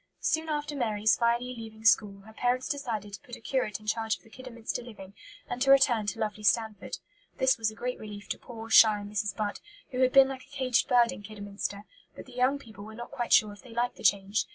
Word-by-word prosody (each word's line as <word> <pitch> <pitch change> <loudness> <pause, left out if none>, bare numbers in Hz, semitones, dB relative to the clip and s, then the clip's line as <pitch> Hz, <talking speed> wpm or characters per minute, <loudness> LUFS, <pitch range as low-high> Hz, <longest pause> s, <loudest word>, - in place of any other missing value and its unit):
Soon 320 0 0
after 295 -1 -2
Mary's 220 -4 +2
finally 240 +1 0
leaving 220 -1 -10
school 200 -3 +4
her 220 +2 -15
parents 245 +2 0
decided 230 -9 -4
to 195 - -7
put 245 - -10
a - - -14
curate 225 -5 -2
in 215 - -17
charge 220 0 0
of - - -28
the 225 - -20
Kidderminster 245 -2 -6
living, 200 -5 -11 0.3
and 245 - -5
to 270 - +2
return 245 -6 +5
to 205 - -2
"lovely 215 -1 -3
Stanford." 220 0 0 0.4
This 260 -2 +3
was 220 -1 +1
a 215 - -11
great 250 +2 -4
relief 210 -1 -9
to - - -3
poor, 225 -2 -9
shy 220 -2 +8
Mrs. 205 -1 -2
Butt, 210 -2 -3 0.3
who 255 - -3
had 255 -1 +4
been 270 0 +7
like 265 -1 -6
a - - -27
caged 260 -4 +1
bird 240 -1 +4
in 265 - -8
Kidderminster; 205 -1 -6 0.3
but - - -10
the 255 - -15
young 255 +3 +2
people 220 -7 -12
were 220 +1 -10
not 240 +1 -8
quite 240 - -4
sure 210 -1 +5
if 205 - -15
they 245 -3 -13
liked 240 +1 -1
the - - -12
change. 200 +1 +2
225 Hz, 235 wpm, -29 LUFS, 210-250 Hz, 0.4 s, shy